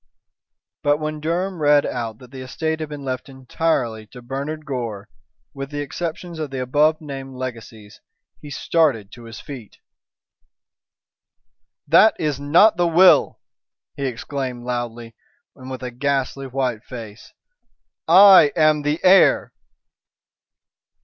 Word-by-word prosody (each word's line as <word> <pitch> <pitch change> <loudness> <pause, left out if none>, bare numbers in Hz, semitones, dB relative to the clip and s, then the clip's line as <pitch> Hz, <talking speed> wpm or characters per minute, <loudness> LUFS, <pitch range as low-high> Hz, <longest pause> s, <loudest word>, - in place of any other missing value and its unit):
But 145 0 +2
when 155 0 -4
Durham 170 +3 -3
read 145 -1 +4
out 115 -3 -4
that 125 0 -16
the 130 -1 -9
estate 160 +5 -3
had 155 -1 -5
been 145 -1 -8
left 130 +1 -5
entirely 130 -4 -2
to 125 +2 -13
Bernard 140 +5 -5
Gore, 115 -7 -5 0.5
with 135 0 -7
the 145 0 -4
exceptions 165 +3 -6
of 155 -2 -4
the 135 -1 -5
above 150 +5 +2
named 135 -3 -8
legacies, 115 -4 -9 0.4
he 150 - -10
started 140 -9 0
to 120 -1 -13
his 115 -1 -10
feet. 125 -7 -11 2.1
"That 170 +9 +5
is 150 -3 -2
not 170 +8 +4
the 175 -1 +2
will!" 175 +3 +4 0.5
he 140 - -3
exclaimed 125 0 -5
loudly, 120 -2 -5 0.4
and 130 0 -11
with 130 0 -7
a 125 - -5
ghastly 135 +1 -2
white 125 -4 -3
face. 115 -4 -10 0.8
"I 185 -3 +8
am 155 -2 +3
the 150 +2 -1
heir." 190 +1 +4
140 Hz, 130 wpm, -21 LUFS, 125-155 Hz, 2.1 s, I